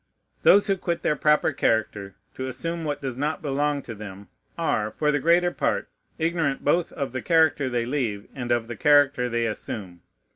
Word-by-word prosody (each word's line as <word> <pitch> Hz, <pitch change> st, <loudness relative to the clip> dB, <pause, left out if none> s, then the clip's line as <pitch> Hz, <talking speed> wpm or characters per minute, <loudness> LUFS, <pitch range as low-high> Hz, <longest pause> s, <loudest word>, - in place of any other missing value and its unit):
Those 200 Hz, -, +6 dB
who 195 Hz, -2 st, +1 dB
quit 170 Hz, -2 st, -3 dB
their 150 Hz, -, +2 dB
proper 150 Hz, +1 st, +3 dB
character 105 Hz, -6 st, -1 dB, 0.2 s
to 130 Hz, -, -5 dB
assume 165 Hz, +5 st, -4 dB
what 145 Hz, -1 st, -3 dB
does 130 Hz, -2 st, -4 dB
not 155 Hz, +4 st, -2 dB
belong 145 Hz, 0 st, 0 dB
to 115 Hz, -, -7 dB
them 100 Hz, -2 st, -10 dB, 0.3 s
are, 105 Hz, 0 st, 0 dB
for 150 Hz, +7 st, 0 dB
the 145 Hz, -, +1 dB
greater 175 Hz, +4 st, +3 dB
part, -, -, -1 dB, 0.3 s
ignorant 160 Hz, -4 st, -1 dB
both 170 Hz, +4 st, +2 dB
of 140 Hz, -4 st, -3 dB
the 130 Hz, 0 st, -4 dB
character 160 Hz, -4 st, +3 dB
they 120 Hz, -2 st, -1 dB
leave 120 Hz, -6 st, -2 dB
and 120 Hz, -3 st, -4 dB
of 120 Hz, -1 st, +1 dB
the 120 Hz, -, -6 dB
character 145 Hz, -1 st, +3 dB
they 120 Hz, 0 st, 0 dB
assume. 100 Hz, -5 st, -5 dB
135 Hz, 185 wpm, -25 LUFS, 115-155 Hz, 0.3 s, Those